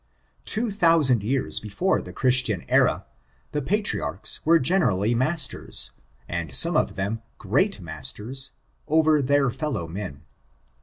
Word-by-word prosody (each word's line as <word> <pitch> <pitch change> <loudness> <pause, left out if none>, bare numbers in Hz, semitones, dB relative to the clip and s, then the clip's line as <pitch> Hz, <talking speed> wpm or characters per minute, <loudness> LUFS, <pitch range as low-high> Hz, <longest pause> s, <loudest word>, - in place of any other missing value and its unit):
Two 220 0 -1
thousand 165 - +3
years 130 +6 0
before 110 - 0
the - - -9
Christian 125 - +1
era, - - +2 0.5
the 150 - -1
patriarchs 205 +8 -1
were 165 +2 +5
generally 125 - +2
masters, 150 +7 -1 0.4
and 80 -6 -4
some - - +4
of - - +1
them 100 +4 -3 0.2
great 135 - +1
masters, 105 - -6 0.4
over 155 -1 +3
their 140 -1 +2
fellow 140 - -3
men. 80 -5 -7
130 Hz, 120 wpm, -24 LUFS, 100-160 Hz, 0.5 s, were